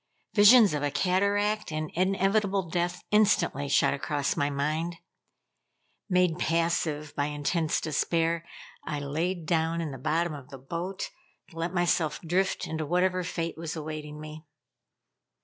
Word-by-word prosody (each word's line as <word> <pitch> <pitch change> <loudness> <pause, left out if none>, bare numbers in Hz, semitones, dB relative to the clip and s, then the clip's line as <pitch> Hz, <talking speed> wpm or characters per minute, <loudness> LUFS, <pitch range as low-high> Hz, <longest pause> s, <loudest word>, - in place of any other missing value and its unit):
Visions 215 -2 +7
of 150 - -1
a 145 - +1
cataract 200 +6 +1
and 155 0 -3
inevitable 195 +1 +1
death 175 +1 -2
instantly 205 -9 +3
shot - - +3
across 140 0 -1
my 145 0 +1
mind. 155 +4 -1 1.1
Made 180 -2 +2
passive 165 -3 0
by 145 - 0
intense 150 +2 0
despair, 165 +2 0 0.4
I 150 - -3
laid 160 +5 -2
down 165 +1 +1
in 160 -3 -3
the 135 - -8
bottom 160 +4 0
of 140 -2 -10
the 135 - -9
boat, 170 +8 -5 0.4
to - - -16
let 165 +1 -1
myself 170 -3 +1
drift 185 +3 0
into 160 0 -3
whatever 180 +4 +1
fate 165 -1 -4
was 165 -1 -4
awaiting 150 -1 -6
me. 155 0 -9
165 Hz, 140 wpm, -28 LUFS, 150-180 Hz, 1.1 s, Visions